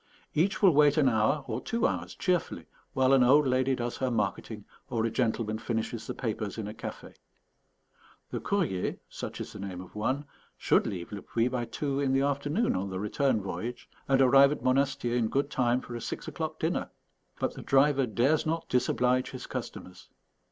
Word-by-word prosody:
Each 195 +7 +1
will 190 - +8
wait 145 +1 +5
an 145 -3 +4
hour 130 +5 +2
or 120 -1 -3
two 230 - -1
hours 90 -1 -2
cheerfully 180 -3 -1 0.3
while 130 0 +3
an 135 - +6
old 140 +4 +6
lady 130 0 +2
does 120 -1 -3
her 130 - 0
marketing 105 -1 -2 0.2
or 115 -3 0
a 115 - -1
gentleman 110 -2 -1
finishes 115 0 -3
the - - -4
papers 110 -4 -3
in 110 -2 -4
a 105 - -6
café. - - -8 1.2
The - - -2
_Courrier_(such 170 - -3
is - - -7
the 105 - -9
name 95 -2 -5
of 90 0 -11
one) 130 +7 -1 0.3
should - - +2
leave 90 -3 -5
Le 100 -1 -6
Puy 115 +1 0
by 125 -2 -2
two 140 +2 -2
in 135 -2 +1
the 135 - +3
afternoon 145 - 0
on 95 +2 -2
the 95 -1 -4
return 110 +2 0
voyage, 120 +5 -5 0.2
and 135 -1 +3
arrive 135 +2 +7
at 150 - -4
Monastier 130 -2 +1
in 120 -2 +2
good 140 +5 -1
time 125 -1 +1
for 120 - -8
a 120 - -5
six - - -5
o'clock - - -4
dinner. - - -1 0.5
But - - -1
the - - -9
driver 135 -1 +3
dares 130 +7 +2
not 165 +1 -2
disoblige 125 0 +1
his 130 -1 -7
customers. 90 - -7
125 Hz, 190 wpm, -29 LUFS, 110-140 Hz, 1.2 s, will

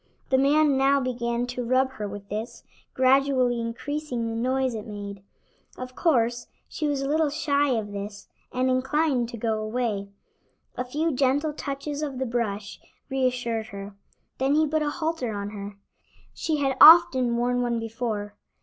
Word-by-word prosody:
The 265 - +5
man 285 +1 +4
now 275 +1 +4
began 240 -2 -2
to 245 0 -4
rub 260 +2 +2
her 215 -6 -5
with 200 0 -8
this, 215 +4 -5 0.3
gradually 260 -2 +3
increasing 245 +2 -3
the 225 0 -3
noise 255 +2 0
it 215 -1 -6
made. 200 -2 -7 0.6
Of 255 0 -7
course, 240 -6 +1 0.2
she 305 - -3
was 280 -2 -1
a - - -2
little 310 +1 +2
shy 290 -1 +1
of 205 -2 -4
this, 200 0 -7 0.2
and 255 +1 0
inclined 260 -1 +1
to 235 - -7
go 220 -1 -1
away. 215 -3 -2 0.7
A 250 - -2
few 300 +6 -1
gentle 285 +3 +1
touches 285 +1 -5
of 285 -4 -3
the 265 - -1
brush 215 -4 -3 0.3
reassured 245 -4 -1
her. 200 0 -8 0.4
Then 270 +2 +2
he 310 +1 +4
put 310 +1 0
a 300 - 0
halter 315 -7 -2
on 200 0 -4
her. 200 -1 -8 0.6
She 315 -2 -1
had 270 -2 0
often 265 -8 +8
worn 245 +1 +1
one 240 -1 0
before. 225 -2 -4
250 Hz, 165 wpm, -25 LUFS, 225-280 Hz, 0.7 s, often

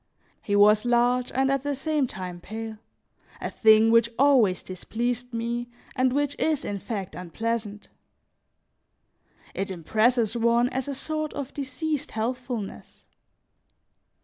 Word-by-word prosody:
He 205 - -1
was 210 +1 +6
large 245 +1 +2
and 265 +1 +1
at 275 -1 +1
the 285 +1 -2
same 295 0 0
time 180 -5 -7
pale, 220 +1 -7 0.6
a - - -4
thing 220 0 +5
which 230 0 +5
always 255 -9 +4
displeased 240 +6 -3
me 235 +1 -3 0.3
and 255 -1 +2
which 285 +1 0
is, 310 -3 0
in 200 -1 -3
fact, 195 -3 -5
unpleasant; 210 +3 -4 1.7
it 195 - -3
impresses 220 +6 +1
one 235 +1 +3
as 265 +1 -3
a 280 - -3
sort 310 +2 -3
of 280 -2 -5
diseased 285 +2 -3
healthfulness. 235 -1 -5
235 Hz, 125 wpm, -26 LUFS, 215-265 Hz, 1.7 s, was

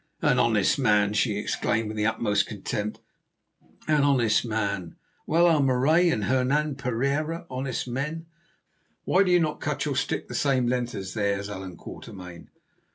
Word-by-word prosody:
"An - - +3
honest 110 +1 +2
man!" 105 -5 +3
she 105 -1 +1
exclaimed 110 +1 -1
with 110 - -5
the 105 0 +1
utmost 105 -3 +1
contempt; 105 0 -4 0.9
"an 150 -2 +3
honest 130 -6 +3
man! 100 -6 -3 0.3
Well, 170 +2 +4
are 165 -4 +4
Marais 140 +7 +3
and 110 -10 0
Hernan 135 +5 +1
Pereira 140 +6 -2
honest 130 -1 -3
men? 150 +7 -4 0.8
Why 185 - +3
do 195 - +2
you 180 0 +5
not 155 -3 -1
cut 150 -1 -2
your 145 -2 -1
stick - - -2
the - - -8
same 135 -3 +1
length 125 0 -1
as 95 -1 -6
theirs, 100 -1 -1
Allan 95 -3 -7
Quatermain? 90 -4 -10
125 Hz, 160 wpm, -26 LUFS, 105-145 Hz, 0.9 s, you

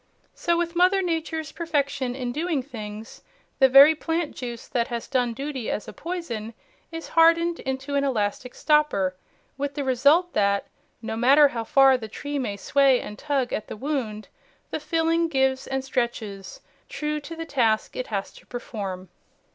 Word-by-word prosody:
So 340 -1 0
with 340 0 -2
Mother 370 +2 +4
Nature's 320 -3 -2
perfection 280 -6 -1
in 250 -2 -3
doing 305 0 -1
things, 215 -4 -9 0.4
the 265 -1 +6
very 275 +4 +9
plant 325 0 -2
juice 240 -2 -6
that 235 -2 0
has 235 -1 -5
done 245 -3 0
duty 270 -3 -4
as 210 - -3
a - - -8
poison 240 -11 -5 0.4
is 330 0 -7
hardened 335 +1 +4
into 265 +2 -4
an 280 0 +2
elastic 245 -1 -2
stopper, 295 -12 +2 0.4
with 285 0 -3
the 285 - -2
result 285 +8 +3
that, 200 -1 +2 0.4
no 220 0 -3
matter 275 +5 +6
how 230 -3 -4
far 270 0 +5
the 220 - -6
tree 285 +6 -5
may 210 -6 -3
sway 275 +2 +3
and 210 - -8
tug 270 -4 -1
at 215 - -3
the - - -7
wound, 230 -6 -3 0.4
the - - -2
filling 330 0 +1
gives 265 -3 +1
and 265 0 -2
stretches, 225 -7 -3 0.3
true 300 0 -2
to 315 +3 -9
the 330 0 -5
task 230 -8 +1
it 255 - -4
has 200 -3 -4
to - - -17
perform. 195 -6 -6
270 Hz, 170 wpm, -25 LUFS, 230-310 Hz, 0.4 s, very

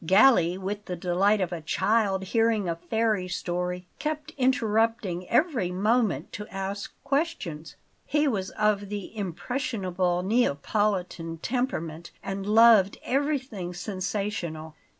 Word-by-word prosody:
Galli, 185 -1 +5
with 205 +2 -4
the 180 - -4
delight 185 +4 +2
of 180 -2 -1
a 170 -2 -4
child 200 +3 +1
hearing 225 0 +1
a 170 - 0
fairy 215 +1 0
story, 180 0 -3
kept 305 0 -3
interrupting 225 -7 +1
every 250 - +2
moment 200 - +1
to 210 0 -6
ask 195 +1 -4
questions. 275 - -2 0.3
He 295 0 +2
was 195 -7 -1
of 210 -2 0
the 205 +1 -6
impressionable 185 - -2
Neapolitan 185 - 0
temperament 170 - -3
and 195 0 -4
loved 220 -2 +6
everything 260 -10 -1
sensational. 185 -4 -3
200 Hz, 115 wpm, -27 LUFS, 180-230 Hz, 0.3 s, loved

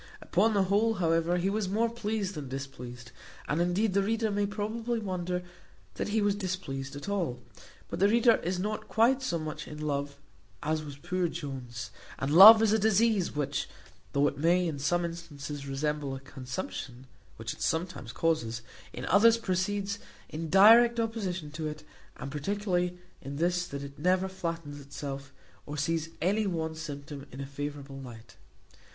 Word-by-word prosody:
Upon 210 +5 +2
the 200 - +4
whole, 210 +4 +2
however, 165 -1 +2
he 185 +2 +1
was 210 -2 -1
more 220 +4 +2
pleased 215 -4 -2
than 145 -6 -6
displeased; 125 -3 -7 0.4
and, 150 +4 +1
indeed, 185 +4 +1
the 200 - +3
reader 220 +2 0
may 205 0 +1
probably 225 +3 -2
wonder 180 -4 -2 0.5
that - - -3
he 210 0 +1
was 205 0 +3
displeased 175 -9 -4
at 145 - -7
all; 175 -12 -1 0.5
but - - -5
the 200 +2 +5
reader 235 +1 +5
is 180 +2 -2
not 210 +3 -3
quite 245 +5 +3
so 175 -10 -1
much 155 -1 -5
in 150 - -8
love 140 -2 -2 0.5
as 155 +1 0
was 145 -2 -8
poor 180 +4 -1
Jones; 130 -7 -6 0.3
and 135 +2 -1
love 215 +6 +11
is 215 -1 +4
a 220 - +3
disease 215 -3 +2
which, 145 -2 -1 0.4
though 140 +1 +4
it - - -3
may, 175 +3 +3
in 150 -4 -3
some 175 +5 +1
instances, 150 -4 -6
resemble 145 0 -2
a - - -6
consumption 130 -1 -6 0.3
(which 115 0 -4
it - - -14
sometimes 160 -7 -2
causes), 120 -8 0 0.3
in 125 - -6
others 225 +5 +6
proceeds 200 0 -1 0.3
in 160 +1 -5
direct 230 +5 +7
opposition 195 -9 -2
to 155 0 -4
it, 155 0 -6 0.3
and 135 - -6
particularly 180 +3 -1 0.2
in 140 +1 -6
this, 175 +3 +1
that 140 0 -6
it 140 +1 -9
never 185 +3 +2
flatters 165 -5 -5
itself, 140 0 -7 0.4
or 150 +1 -5
sees 160 +2 0
any 205 +4 +2
one 160 -3 -2
symptom 145 -2 -7
in 130 - -9
a 140 - -3
favourable 140 0 -6
light. 120 -3 -11
170 Hz, 170 wpm, -29 LUFS, 145-200 Hz, 0.5 s, love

